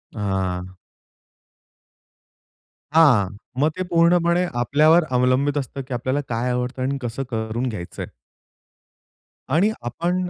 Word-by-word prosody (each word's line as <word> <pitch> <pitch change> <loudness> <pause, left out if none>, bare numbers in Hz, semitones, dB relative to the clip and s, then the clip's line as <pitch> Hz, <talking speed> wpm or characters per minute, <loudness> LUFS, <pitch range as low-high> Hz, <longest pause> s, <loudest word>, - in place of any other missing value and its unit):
हां, 95 -3 -2 2.2
हां, 140 -12 +5 0.3
मग 150 - +4
ते 185 - -1
पूर्णपणे 170 +1 +3 0.2
आपल्यावर 155 +7 +4
अवलंबित 130 +3 +2
असतं 135 0 -4
की 130 - -5
आपल्याला 130 +4 -1
काय 120 +1 -1
आवडतं 125 +1 -3
आणि 135 +2 -1
कसं 125 +2 -3
करून 110 +1 -2
घ्यायचंय. 90 -6 -6 1.4
आणि 175 +10 +3
आपण 175 +9 -2
130 Hz, 105 wpm, -22 LUFS, 115-160 Hz, 2.2 s, हां